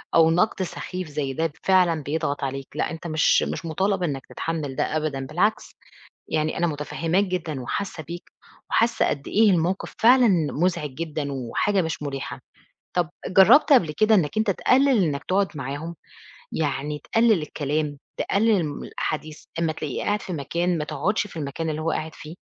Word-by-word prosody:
أو 165 -1 +6
نقْد 185 +3 +2
سخيف 180 0 -5
زي 145 -2 -3
ده 165 +3 -1
فعلًا 180 -5 +3
بيضغط 145 -1 -2
عليك، 135 0 -3
لأ - - -1
أنت 165 +1 -6
مش 155 -1 +3
مش - - -4
مُطالَب 190 +4 0
إنك 140 -6 -2
تتحمّل 155 -5 -4
ده 155 - 0
أبدًا، 145 -4 -2
بالعكس 180 +10 0 0.5
يعني 155 0 -1
أنا 175 - +2
متفهّماك 165 +4 0
جدًا 175 -7 -3
وحاسّة 160 +6 -4
بيك 170 +4 -9 0.4
وحاسّة 230 +1 +2
قد 140 0 -3
إيه 215 0 +4
الموقِف 180 +1 0
فعلًا 245 +1 +6 0.2
مُزعِج 160 -2 0
جدًا 150 -2 -4
وحاجة 140 - 0
مش 160 -2 -3
مُريحة. 135 -3 -5 0.5
طَب 175 -3 +1 0.2
جرّبت 245 +11 +6
قبل 175 - +4
كده 215 +8 +4
إنك 165 -2 +1
أنت 215 -2 +2
تقلّل 255 +2 +3
إنك 145 -3 -1
تقعُد 195 +1 +1
معاهم. 145 +5 -5 0.6
يعني 150 -1 -2
تقلّل 225 -1 +2
الكلام، 150 0 -2 0.2
تقلّل 205 -3 +2
من 145 -2 -5
الأحاديث، 155 0 -4
أمّا 165 -1 +1
تلاقيه 150 -3 -4
قاعد 205 0 0
في 185 - -6
مكان 170 +3 -1
ما 150 - -1
تقعُدش 205 +6 -1
في 190 - -14
المكان 155 +2 -3
اللي 155 0 -3
هو 165 - 0
قاعد 160 0 -3
فيه؟ 155 +2 -10
165 Hz, 170 wpm, -24 LUFS, 150-190 Hz, 0.6 s, أو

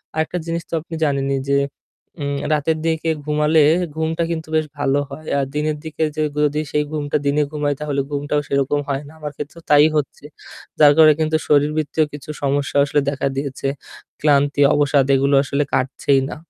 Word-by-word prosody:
আরেকটা 160 +3 -1
জিনিস 165 0 -2
তো - - -12
আপনি 165 0 -8
জানেনই 135 -1 0
যে 140 - +3 0.6
উম 140 0 -2 0.2
রাতের 155 +2 0
দিকে 160 0 0 0.2
ঘুমালে 150 +1 +3 0.3
ঘুমটা 160 +1 -1
কিন্তু 160 -1 -4
বেশ 155 -1 +2
ভালো 140 0 +1
হয়। 155 +3 -8
আর 135 - 0
দিনের 150 0 -1
দিকে 160 0 -3
যে 155 - 0 0.2
যদি 150 +1 +1
সেই 150 0 +1
ঘুমটা 145 -2 -1
দিনে 145 +1 +2
ঘুমাই 145 -1 -1
তাহলে 145 -2 -1
ঘুমটাও 145 +1 -1
সেরকম 140 +1 0
হয় 140 +1 -2
না। - - -13
আমার 150 -1 -5
ক্ষেত্রেও 155 +3 -8
তাই 145 +1 +7
হচ্ছে। 145 0 -4 0.5
যার 145 -1 +8
কারণে 155 -1 +8
কিন্তু 155 0 +2
শরীরবৃত্তীয় 150 +1 +2
কিছু 145 +1 -10
সমস্যাও 140 0 +1
আসলে 145 0 +1
দেখা 140 0 -2
দিয়েছে। 135 -1 -3 0.5
ক্লান্তি, 145 -1 +3
অবসাদ 145 -2 +3
এগুলো 140 +1 +2
আসলে 140 +1 0
কাটছেই 135 +1 +1
না। - - -6
145 Hz, 175 wpm, -20 LUFS, 140-155 Hz, 0.6 s, যার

